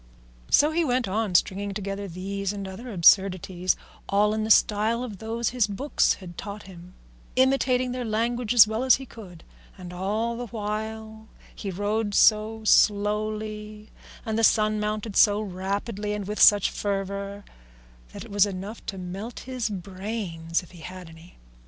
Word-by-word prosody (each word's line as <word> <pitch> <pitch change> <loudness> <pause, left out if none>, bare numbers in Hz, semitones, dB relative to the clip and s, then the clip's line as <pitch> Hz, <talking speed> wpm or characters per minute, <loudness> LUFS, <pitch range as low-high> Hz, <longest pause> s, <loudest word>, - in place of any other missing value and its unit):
So 300 +2 +5
he 335 +2 +1
went 255 -5 0
on 205 -1 -1
stringing 195 +3 +1
together 200 0 -4
these 195 +2 -4
and 200 -1 -6
other 230 +6 -8
absurdities, 185 -1 +3 0.3
all 210 +1 +3
in 215 0 -1
the 220 - -3
style 220 +2 +3
of 215 -7 -7
those 230 +1 -2
his 245 -4 +1
books 255 +9 +1
had 175 -3 -11
taught 205 0 -7
him, 180 -1 -13 0.4
imitating 255 -1 +2
their 250 0 -3
language 230 +1 -1
as 240 -4 +9
well 220 +3 -2
as 260 - +6
he 270 - -8
could; 185 -9 -12 0.3
and 180 -1 -9
all 215 +6 -2
the 245 0 -5
while 220 +1 -5 0.3
he 200 - -6
rode 205 +2 -1
so 220 +1 +3
slowly 210 +1 +1 0.3
and 220 -1 -1
the - - +1
sun 215 -1 +3
mounted 210 0 -3
so 205 -1 +5
rapidly 205 +2 -3
and 205 -2 -4
with 210 +1 -3
such 205 -2 +6
fervour 200 0 -4 0.7
that - - -9
it - - -13
was 205 0 +4
enough 200 +3 -7
to 195 - -4
melt 190 +6 -7
his 255 -3 -3
brains 185 -3 -4
if 180 - -16
he 175 - -14
had 180 +1 -9
any. 165 +2 -16
210 Hz, 165 wpm, -25 LUFS, 195-220 Hz, 0.7 s, as